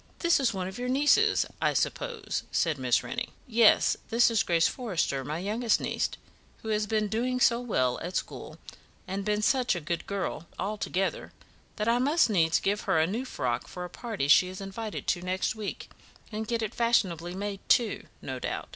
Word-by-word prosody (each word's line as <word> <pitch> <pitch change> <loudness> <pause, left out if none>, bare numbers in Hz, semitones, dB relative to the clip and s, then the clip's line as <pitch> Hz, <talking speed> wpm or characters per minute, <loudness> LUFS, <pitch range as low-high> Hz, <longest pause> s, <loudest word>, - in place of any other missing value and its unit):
"This 340 -3 +3
is 265 -4 +2
one 190 -3 -3
of 190 +4 -7
your 250 0 -2
nieces, 295 +11 +4 0.2
I - - +2
suppose?" - - -2
said 160 -5 +1
Miss 125 -2 +2
Rennie. 235 -1 -4 0.2
"Yes, 230 -2 +5
this 235 +1 +4
is 225 - +3
Grace 170 -1 +3
Forrester, 180 - -2
my 150 +4 -3
youngest 215 +5 +1
niece, - - -1 0.5
who 220 - -5
has 210 -1 0
been 215 0 +1
doing 245 +4 -1
so 235 -1 +4
well 130 - 0
at 180 +2 -5
school, - - -4 0.5
and 195 +1 -3
been 210 +1 0
such 250 -3 +2
a - - -2
good 170 +2 -4
girl 190 -4 -3
altogether, 195 -2 -2 0.4
that 210 +1 -2
I 235 +1 +3
must 285 -1 +3
needs 165 -5 +3
give 205 +2 0
her - - +4
a 160 - +4
new 220 +9 -3
frock 125 - -2
for 180 0 -6
a 175 - -10
party 220 - -3
she 165 +5 +6
is 185 0 -7
invited 200 +3 -5
to 175 - 0
next 185 +1 -1
week, 215 -2 -6 0.4
and 220 0 -4
get 235 -1 -1
it 220 +1 -3
fashionably 185 -8 +1
made, 200 0 -4
too, 235 -3 +2 0.2
no - - -4
doubt." - - -4
210 Hz, 190 wpm, -28 LUFS, 180-235 Hz, 0.5 s, she